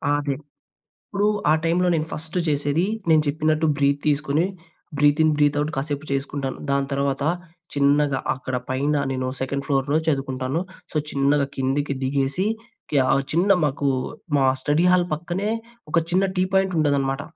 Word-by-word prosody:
ఆదె. 145 -1 -1 0.8
ఇప్పుడు 205 0 0 0.2
ఆ - - +6
టైమ్‌లో 175 +2 +2
నేను 155 -1 0
ఫస్టు 160 +3 -4
జేసేది 145 +3 +1 0.2
నేను 155 -1 +5
చెప్పినట్టు, 155 +2 +1
బ్రీత్ 140 0 +2
తీసుకొని, 150 +2 +2 0.5
బ్రీత్ 145 +2 +4
ఇన్, 155 - +4
బ్రీత్ 145 -1 +3
అవుట్ 150 +1 -1
కాసేపు 145 +2 -3
చేసుకుంటాను. 140 -1 -3
దాని 140 0 +1
తరువాత, 140 0 0 0.5
చిన్నగా 140 0 +3 0.2
అక్కడ 130 0 -4
పైన 140 +3 +1 0.2
నేను 130 0 -2
సెకండ్ 140 +1 -2
ఫ్లోర్‌లో 140 +1 +1
చదువుకుంటాను. 135 0 -1 0.3
సో, - - -6
చిన్నగా 140 +1 +2
కిందకి 135 +2 0
దిగేసి, 135 +6 0 0.5
క్యా 140 -3 +4
ఆహ్, 135 0 +1
చిన్న 175 +5 +2 0.2
మాకు 140 0 -1 0.5
మా 135 - +3 0.2
స్టడీ‌హాల్ 175 +5 +3
పక్కనే 175 +6 -3 0.4
ఒక - - +4
చిన్న 185 +2 +3
టీ 185 - +3
పాయింట్ 190 -1 +2
ఉంటదనమాట. 140 -2 +1
145 Hz, 145 wpm, -23 LUFS, 140-155 Hz, 0.8 s, ఆ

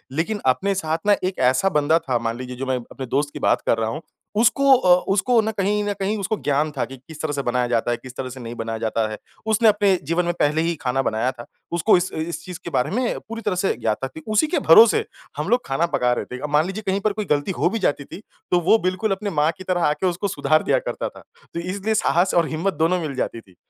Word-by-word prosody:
लेकिन 200 +7 -1
अपने 190 +10 +2
साथ 160 -4 -1
ना 205 - +6
एक 185 +1 -2
ऐसा 160 +9 +1
बंदा 155 +3 +3
था 130 -7 -1
मान 115 0 -3
लीजिए 125 0 -7
जो 130 +2 -4
मैं 130 -1 0
अपने 135 - -6
दोस्त 140 +4 0
की - - -6
बात - - +2
कर - - +2
रहा 110 -1 -1
हूँ 155 +7 -5 0.4
उसको 275 +4 +5
अ, 180 -7 +5 0.2
उसको 235 +4 +3
ना 220 0 -1
कहीं 210 0 0
न 205 0 -1
कहीं 200 +3 -1
उसको 200 +2 -1
ज्ञान 145 +2 +1
था 140 - -2
कि 135 - -10
किस 150 +4 -12
तरह 155 -2 -2
से 140 - -1
बनाया 125 0 0
जाता 120 0 0
है, 120 - 0
किस 130 +1 -12
तरह 130 - -4
से 130 +1 -9
नहीं 120 -1 -7
बनाया 115 -1 -4
जाता 110 0 0
है। 105 - -5 0.3
उसने 225 +1 +4
अपने 205 -2 +3
जीवन 170 +5 0
में 175 - 0
पहले 150 +2 +2
ही 170 +1 0
खाना 135 0 0
बनाया 120 +1 0
था। 120 -2 -11 0.3
उसको 170 -2 +3
इस 180 +1 -2
इस 160 +2 -4
चीज़ 180 -3 -7
के - - -5
बारे 135 -3 0
में 245 +3 -1
पूरी 230 0 -5
तरह 210 -4 -1
से 195 - +2
ज्ञात 110 -2 0
था। - - -5 0.2
उसी 215 +8 +2
के 330 - 0
भरोसे 220 +7 +8 0.3
हम 150 +6 -2
लोग 245 +2 +2
खाना 135 +5 0
पका 125 -1 +2
रहे - - -3
थे। 125 - -8
अब 150 - -4
मान 150 +2 +3
लीजिए 195 +4 -5
कहीं 190 +1 +1
पर 215 0 0
कोई 215 0 -3
गलती 145 +1 0
हो 170 - +2
भी 225 +4 -2
जाती 145 -7 0
थी 190 - -10 0.3
तो 180 - +4
वो 225 - +7
बिल्कुल 185 +4 0
अपनी 200 +2 -2
माँ 150 +2 +3
की 190 - -9
तरह 180 -2 -1
आके 150 +5 0
उसको 180 +3 -1
सुधार 155 -2 +1
दिया - - +2
करता - - -4
था। - - -15 0.3
तो 170 - -3
इसलिए 195 +5 -2
साहस 180 -2 +2
और 170 -2 +3
हिम्मत 170 +5 -1
दोनों 165 +4 +1
मिल 150 -4 -4
जाती 115 -2 -3
थी। 95 -4 -23
165 Hz, 270 wpm, -22 LUFS, 130-195 Hz, 0.4 s, भरोसे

